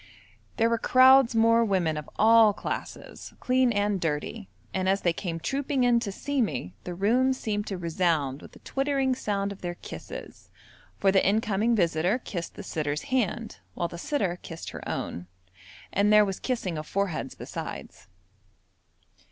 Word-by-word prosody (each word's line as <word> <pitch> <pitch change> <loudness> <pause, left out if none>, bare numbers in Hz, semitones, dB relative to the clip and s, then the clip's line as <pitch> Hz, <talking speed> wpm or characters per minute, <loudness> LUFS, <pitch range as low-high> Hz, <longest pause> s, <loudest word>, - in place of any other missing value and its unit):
There 225 - +3
were 230 0 +1
crowds 255 0 +6
more 230 +1 +5
women 185 -7 +1
of 150 -1 -6
all 220 -1 +6
classes, - - -6
clean 255 -1 +2
and 205 -3 0
dirty, 165 +7 -3 0.2
and 185 0 0
as 195 +1 +2
they 175 - +2
came 170 -2 -4
trooping 270 - -1
in 240 -1 +4
to 210 -4 -4
see 280 +7 -2
me, 125 - -2
the 180 - -5
room 245 +8 +2
seemed 210 -4 -3
to 195 - -3
resound 165 -5 0
with - - -13
the - - -15
twittering 270 -1 0
sound 200 -5 -2
of 200 - -10
their 175 -1 -4
kisses, - - -10 0.5
for 195 - +3
the 190 - +3
incoming 215 +2 +2
visitor 175 +2 +2
kissed 180 -9 -6
the 205 - -8
sitter's 150 -4 -3
hand, 230 -2 -1 0.2
while 170 - -1
the 170 - -9
sitter 190 - -1
kissed 165 -1 -8
her - - -8
own, 90 +1 -4 0.7
and 205 +1 +3
there 210 0 +7
was 195 -2 -4
kissing 190 -11 -2
of 155 - -8
foreheads 170 -9 -2
besides. - - -8
200 Hz, 165 wpm, -27 LUFS, 175-235 Hz, 0.7 s, there